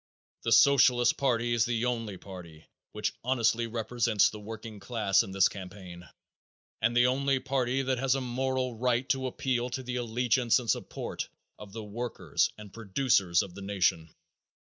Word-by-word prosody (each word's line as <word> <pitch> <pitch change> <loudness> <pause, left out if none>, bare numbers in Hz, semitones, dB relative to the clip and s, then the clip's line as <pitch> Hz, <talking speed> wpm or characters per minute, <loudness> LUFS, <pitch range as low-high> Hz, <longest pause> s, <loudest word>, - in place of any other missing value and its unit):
The - - -2
Socialist 125 -3 +5
party 120 -3 +1
is 115 -1 +3
the 120 0 -1
only 115 -5 -2
party 90 -5 -11 0.3
which - - -2
honestly 120 -2 +1
represents 115 -1 +1
the 105 - -9
working 110 0 -8
class 100 -2 +1
in - - -6
this 95 -1 +4
campaign 90 -3 -10 0.7
and 120 +1 +2
the 120 - +6
only 135 +1 +1
party 130 0 -1
that 130 -1 -1
has 135 0 +2
a - - -1
moral 130 0 -2
right 125 +1 +1
to 130 0 0
appeal 125 -1 -1
to 130 +1 -4
the 125 0 -4
allegiance 120 0 +1
and 125 -3 -5
support - - -4 0.3
of 105 -2 -11
the 110 +1 -7
workers 115 +3 -1
and 105 -2 -12
producers 100 -5 +1
of 90 - -10
the 100 - -10
nation. 95 -5 0
120 Hz, 165 wpm, -29 LUFS, 105-125 Hz, 0.7 s, the